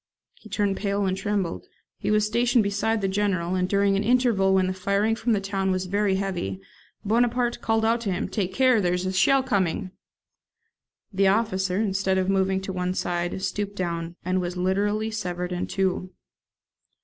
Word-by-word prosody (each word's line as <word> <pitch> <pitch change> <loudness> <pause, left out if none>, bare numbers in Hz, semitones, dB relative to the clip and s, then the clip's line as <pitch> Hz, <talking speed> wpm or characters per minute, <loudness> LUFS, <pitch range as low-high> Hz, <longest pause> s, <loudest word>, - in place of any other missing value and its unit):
He 215 - -16
turned 200 -1 0
pale 200 -1 -1
and 185 0 0
trembled. 195 - -2 0.3
He - - -2
was 210 0 +3
stationed 235 +2 +2
beside 205 +2 0
the 195 - +1
General, 190 -3 0
and 185 0 0
during 200 0 +2
an 200 - 0
interval 230 -5 +3
when 190 -1 +3
the 185 - -1
firing 200 +4 0
from 230 0 0
the 205 - +2
town 195 -1 -2
was 185 0 0
very 200 +1 +1
heavy, 180 - -3 0.5
Bonaparte 240 +2 +1
called 225 0 +1
out 230 +1 +2
to 205 -4 -2
him, 180 - -2
"Take 190 -1 -2
care, 255 0 +3
there 180 -1 +1
is 180 +1 -3
a 185 - -1
shell 260 +9 +4
coming!" 190 -6 -1 1.2
The 195 +1 +3
officer, 190 -2 +1
instead 195 -2 0
of 185 0 0
moving 190 0 +1
to 190 0 -5
one 180 0 -2
side, 175 0 -2
stooped 205 +1 -3
down, 170 -2 -3
and 185 0 +1
was 180 0 -4
literally 205 +4 0
severed 180 -4 -3
in 180 0 -2
two. 185 -1 -1
195 Hz, 185 wpm, -25 LUFS, 185-210 Hz, 1.2 s, shell